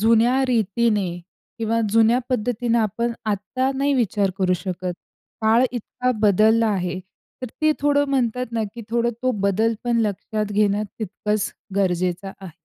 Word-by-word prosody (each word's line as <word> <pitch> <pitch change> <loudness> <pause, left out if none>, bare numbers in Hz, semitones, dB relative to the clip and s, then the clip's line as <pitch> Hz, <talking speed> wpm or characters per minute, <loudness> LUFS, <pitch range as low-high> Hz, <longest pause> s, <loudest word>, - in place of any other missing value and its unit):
जुन्या 230 +4 +4
रीतीने 215 -3 +1 0.5
किंवा 230 +1 0
जुन्या 225 +2 +4
पद्धतीनं 240 -1 0
आपण 230 +2 0 0.2
आत्ता 255 +7 -1
नाही 280 +1 +1
विचार 205 -5 +1
करू 185 -1 +2
शकत. 180 0 -4 0.5
काळ 225 +3 +4
इतका 250 +1 -2
बदलला 220 +2 +4
आहे, 185 -2 -1 0.4
तर - - -2 0.2
ते 310 - +5
थोडं 285 0 +3
म्हणतात 250 -2 0
ना, 225 -1 0
की 235 - -7
थोडं 235 0 +1
तो 255 - +2 0.2
बदल 220 +4 +2
पण 240 -1 +1
लक्षात 210 +1 -3
घेणं 205 0 +2 0.2
तितकंच 210 0 -2 0.2
गरजेचं 185 0 0
आहे. 190 - -8
220 Hz, 140 wpm, -22 LUFS, 200-240 Hz, 0.5 s, ते